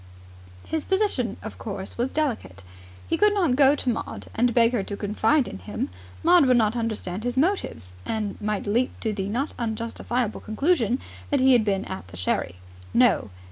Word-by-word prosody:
His 320 -2 -2
position, 380 - 0
of 220 - -8
course, 195 -3 -6
was 240 +2 0
delicate. 225 - -2 0.4
He 330 - 0
could 420 0 +5
not 345 -11 +2
go 280 +1 +6
to 275 - -5
Maud 235 - -4
and 240 +2 +2
beg 235 0 +4
her 240 -5 0
to 200 +1 -5
confide 220 +7 +2
in 95 - -7
him. 95 - -4 0.3
Maud 345 -4 +6
would 250 -1 +5
not 220 0 +2
understand 220 -4 -3
his 245 +1 -2
motives, 295 - 0
and 210 - -2
might 210 -1 -2
leap 235 +5 0
to 220 -2 -1
the 195 -1 -3
not 260 +8 -2
unjustifiable 230 0 -2
conclusion 250 - +1 0.3
that 285 - +2
he 260 0 +6
had 240 -3 +5
been 200 -1 0
at 190 - -7
the 90 0 -11
sherry. 90 0 -1 0.4
No! 235 - +4
230 Hz, 180 wpm, -25 LUFS, 205-265 Hz, 0.4 s, go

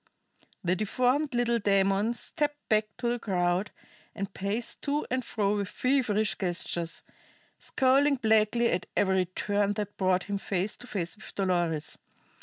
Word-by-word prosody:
The 180 0 +2
deformed 250 - +1
little 235 -1 +2
demon 200 +2 +2
stepped 295 +4 -3
back 215 0 +3
to 240 - -2
the 240 0 0
crowd, 180 -1 0 0.5
and 195 -1 -4
paced 205 +5 -2
to 290 +1 -1
and 255 0 0
fro 210 -3 0
with 200 -1 -2
feverish 230 -5 +1
gestures, 175 -2 -1 0.6
scowling 275 +2 +3
blackly 220 0 +3
at 175 - -2
every 190 -2 +3
turn 205 +2 0
that 205 0 -5
brought 185 -3 +2
him 200 -1 -3
face 195 +1 -1
to 245 - -9
face 175 -5 -3
with - - -12
Dolores. 175 -5 -1
205 Hz, 145 wpm, -28 LUFS, 190-240 Hz, 0.6 s, back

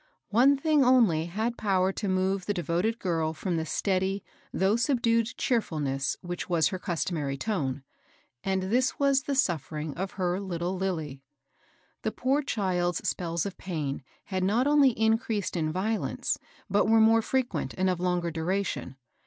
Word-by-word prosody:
One 260 +6 +5
thing 300 0 +3
only 225 -11 +4
had 220 +7 -2
power 190 -2 +2
to 205 +1 -4
move 185 0 0
the 205 - 0
devoted 175 +6 0
girl 165 -6 -1
from 180 +1 -2
the 160 0 -2
steady, 190 +2 0 0.3
though 195 +3 +2
subdued, 230 -1 +1
cheerfulness 150 - -1
which 175 0 -5
was 160 -5 +3
her 185 - -4
customary 160 -6 -2
tone, 140 -8 -2 0.6
and 190 -1 0
this 245 +7 +1
was 275 -1 +3
the 280 0 -2
suffering 155 - -1
of 190 +5 -4
her 180 -1 -1
little 180 -1 -3
Lilly. 160 -8 -3 0.8
The 220 - -1
poor 265 +6 +1
child's 180 - -1
spells 170 -2 -1
of 200 - -6
pain 150 -7 -3 0.2
had 185 -2 -2
not 220 +7 +2
only 290 -2 +5
in 220 -1 +2
creased 220 -7 -3
in 155 -2 0
violence, 210 +6 -1 0.3
but 205 +1 +2
were 225 0 +6
more 225 +1 +5
frequent 255 +2 -1
and 190 0 +2
of 180 -2 0
longer 175 -1 0
duration. 165 -4 -2
190 Hz, 160 wpm, -28 LUFS, 170-225 Hz, 0.8 s, were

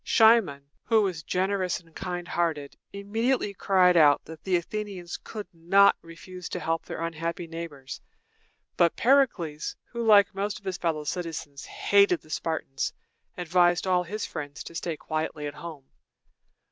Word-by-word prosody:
Cimon, 220 -11 +4 0.2
who 220 -2 +4
was 180 -5 -2
generous 185 +2 -1
and 165 -3 -23
kind 180 -2 -5
hearted, 160 -6 -2 0.2
immediately 210 +3 -1
cried 185 -2 +3
out 150 -4 +5
that 160 0 -11
the 190 -2 +1
Athenians 185 0 -4
could 210 -2 -8
not 185 +4 +5
refuse 165 +2 -10
to - - -4
help 165 0 -1
their - - -6
unhappy 165 +1 -3
neighbors; 160 -5 -8 0.8
but 170 -1 +3
Pericles, 225 - +2 0.2
who, 235 -1 -3
like 205 -3 +6
most 200 +1 -2
of 200 - -17
his 190 -2 -3
fellow 160 -3 -1
citizens, 155 -4 -5
hated 200 -4 +3
the 155 - -16
Spartans, 155 -4 -2 0.5
advised 175 0 +2
all 180 -1 +3
his 205 +5 -4
friends 145 -1 -6
to - - -10
stay 165 -1 -3
quietly 155 -1 -3
at 145 - -4
home. 155 -3 -9
175 Hz, 150 wpm, -27 LUFS, 160-200 Hz, 0.8 s, like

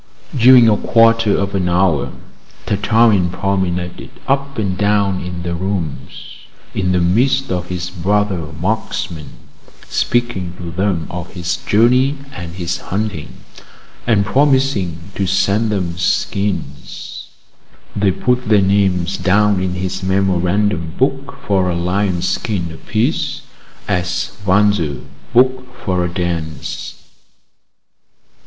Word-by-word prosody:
During 125 -1 +7
a 105 -2 +4
quarter 115 -2 +4
of 100 +1 -2
an 90 -3 0
hour, 85 -5 +2 0.5
Tartarin 105 -2 +3
promenaded 90 -2 -2 0.2
up 140 0 0
and 100 -4 -1
down 100 -1 +1
in 90 -1 -6
the 85 0 -2
rooms 85 -4 -5 0.4
in 90 -2 0
the 90 - +2
midst 125 +10 +2
of 90 -1 -2
his 90 0 -4
brother 95 -2 0
marksmen, 90 -5 -3 0.6
speaking 120 -8 -1
to 85 -1 -6
them 90 -2 -1
of 90 0 -6
his 90 -1 -2
journey 125 +6 +3 0.2
and 85 -9 -7
his 90 -1 -3
hunting, 100 -5 -4 0.6
and 105 -4 +3
promising 130 - +1
to 95 - -1
send 100 +4 +1
them 90 -5 -1
skins; 100 -7 -2 0.7
they 100 -1 +2
put 125 +6 0
their 105 -2 +6
names 95 -2 +1
down 100 0 +3
in 90 -1 -2
his 95 +1 -3
memorandum 95 -2 0
book 135 +1 -1
for 95 -2 +2
a 85 - -1
lionskin 90 0 -1
apiece, 80 - -2 0.4
as 90 0 -1
waltzers 95 -7 +2 0.3
book 130 0 +2
for 90 -1 +1
a 85 - -2
dance. 85 -5 -4
95 Hz, 115 wpm, -17 LUFS, 90-105 Hz, 0.7 s, During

